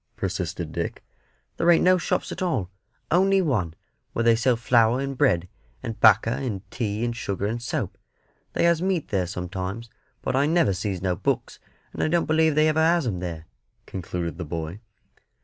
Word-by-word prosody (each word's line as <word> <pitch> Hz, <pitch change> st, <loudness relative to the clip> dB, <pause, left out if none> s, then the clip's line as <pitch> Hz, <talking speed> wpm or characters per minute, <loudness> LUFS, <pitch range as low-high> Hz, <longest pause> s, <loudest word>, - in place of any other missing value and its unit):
persisted -, -, -3 dB
Dick. -, -, -4 dB, 0.5 s
"There 170 Hz, -, +2 dB
ain't 170 Hz, -, +6 dB
no 185 Hz, 0 st, +5 dB
shops -, -, -1 dB
at -, -, -6 dB
all 130 Hz, -, -1 dB, 0.4 s
only 195 Hz, +3 st, +4 dB
one, 110 Hz, -, 0 dB, 0.4 s
where 115 Hz, -, 0 dB
they 115 Hz, 0 st, +5 dB
sells 120 Hz, 0 st, +2 dB
flour, 115 Hz, +1 st, +3 dB
and 135 Hz, 0 st, -3 dB
bread, 90 Hz, -, +2 dB, 0.4 s
and 115 Hz, -, -5 dB
'bacca, 110 Hz, +1 st, +6 dB
and 105 Hz, -8 st, -3 dB
tea, 110 Hz, -1 st, -2 dB
and 120 Hz, -1 st, -2 dB
sugar, 100 Hz, -3 st, -3 dB
and 115 Hz, +3 st, -2 dB
soap. 125 Hz, -, -3 dB, 0.5 s
They -, -, +1 dB
has 170 Hz, -1 st, +3 dB
meat 185 Hz, -4 st, 0 dB
there 95 Hz, -3 st, 0 dB
sometimes; 95 Hz, +5 st, -5 dB, 0.3 s
but -, -, -1 dB
I 140 Hz, +2 st, +3 dB
never 160 Hz, -, +3 dB
sees 95 Hz, 0 st, -3 dB
no 90 Hz, -2 st, +1 dB
books, -, -, -2 dB, 0.3 s
and -, -, -4 dB
I -, -, +2 dB
don't 170 Hz, +1 st, +2 dB
believe 160 Hz, -1 st, +3 dB
they 155 Hz, +1 st, +4 dB
ever 155 Hz, 0 st, +2 dB
has 165 Hz, -1 st, +3 dB
'em 100 Hz, -7 st, -2 dB
there," 85 Hz, -3 st, -5 dB, 0.4 s
concluded 90 Hz, -2 st, -4 dB
the -, -, -2 dB
boy. 80 Hz, +4 st, -5 dB
115 Hz, 185 wpm, -25 LUFS, 95-155 Hz, 0.5 s, ain't